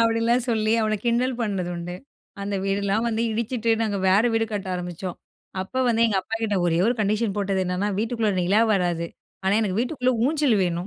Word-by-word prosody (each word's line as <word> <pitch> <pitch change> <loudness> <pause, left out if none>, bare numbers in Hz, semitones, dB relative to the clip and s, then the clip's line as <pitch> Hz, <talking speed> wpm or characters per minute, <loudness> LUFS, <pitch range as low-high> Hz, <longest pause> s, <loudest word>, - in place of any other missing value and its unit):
அப்படின்லாம் 230 +2 +2
சொல்லி 220 -1 +1
அவன 215 0 +1
கிண்டல் 245 +2 +1
பண்ணது 190 -5 -2
உண்டு. 170 +1 -5 0.5
அந்த 200 0 -3
வீடுலாம் 200 +3 0
வந்து 225 0 -1
இடிச்சுட்டு 230 +1 -1
நாங்க 205 -3 -1
வேற 195 +4 +5
வீடு 225 0 +2
கட்ட 200 -2 -3
ஆரம்பிச்சோம். 180 0 -5 0.5
அப்ப 260 +7 -2
வந்து 230 0 +3
எங்க 200 -3 +1
அப்பாகிட்ட 225 0 -2
ஒரே 165 0 +2
ஒரு 240 - +2
கண்டிஷன் 210 0 0
போட்டது 195 -1 0
என்னன்னா, 185 +3 -1
வீட்டுக்குள்ளே 225 -2 0
நிலா 200 +5 +3
வராது 175 -3 0 0.4
ஆனா 195 +2 +3
எனக்கு 205 -1 -1
வீட்டுக்குள்ள 255 -1 0
ஊஞ்சல் 290 -6 +2
வேணும். 175 +1 -2
215 Hz, 175 wpm, -24 LUFS, 190-230 Hz, 0.5 s, வேற